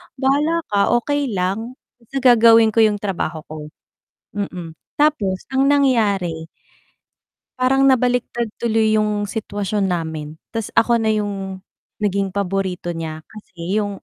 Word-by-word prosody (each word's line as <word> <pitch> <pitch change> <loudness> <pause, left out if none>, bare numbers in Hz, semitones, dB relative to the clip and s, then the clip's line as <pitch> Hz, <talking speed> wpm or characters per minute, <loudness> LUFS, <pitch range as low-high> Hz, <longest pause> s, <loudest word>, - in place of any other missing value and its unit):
"Bahala 290 +5 +1
ka, 200 -1 +3
okay 285 +4 0
lang. 200 +7 -2 0.2
Basta 255 +3 -6
gagawin 230 -2 +6
ko 225 - 0
yung 215 -2 +4
trabaho 180 -6 -3
ko." 155 -1 -7 0.7
mm. 180 -5 -5 0.2
Tapos 220 -12 +1
ang 270 +1 +3
nangyari 205 - +1 1.1
parang 270 +2 +3
nabaliktad 245 -3 +1
tuloy 220 -2 +2
'yong 210 -1 -1
sitwasyon 205 -2 -2
namin, 160 -4 -3 0.2
'tas 225 -2 -5
ako 235 +1 +4
na 225 - -1
'yong 195 -3 -4 0.4
naging 195 -2 0
paborito 190 -2 -2
niya. 160 -2 -5
Kasi 190 -2 -5
'yong 205 -2 -3
210 Hz, 125 wpm, -20 LUFS, 190-240 Hz, 1.1 s, gagawin